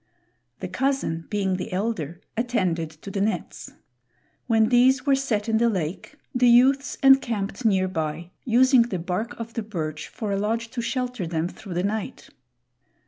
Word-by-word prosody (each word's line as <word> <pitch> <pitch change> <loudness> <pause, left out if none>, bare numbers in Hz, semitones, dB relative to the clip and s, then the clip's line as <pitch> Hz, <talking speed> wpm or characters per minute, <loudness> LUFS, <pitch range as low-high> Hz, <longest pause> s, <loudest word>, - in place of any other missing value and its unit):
The - - -3
cousin, 265 -12 -1
being 195 -3 0
the 190 +4 -5
elder, 180 -4 -3
attended 190 -9 0
to 200 - -6
the 195 - -2
nets. 200 -4 -3 0.8
When 225 -2 +3
these 255 +2 +4
were 280 - +4
set 240 -6 0
in 220 -1 +2
the 235 0 +3
lake, 185 - -4 0.2
the 250 -1 +3
youths 265 +3 +4
encamped 245 -5 +3
near 190 -3 +3
by, 160 -1 -4
using 255 +1 +5
the 230 -5 -1
bark 180 +8 -4
of 230 0 -6
the 230 - -2
birch 155 -8 -5
for 215 -4 -5
a 195 - 0
lodge 225 +3 -1
to 240 - -3
shelter 250 -5 -2
them 165 0 -1
through 185 0 -9
the 180 - 0
night. 210 +1 -4
220 Hz, 165 wpm, -24 LUFS, 185-245 Hz, 0.8 s, using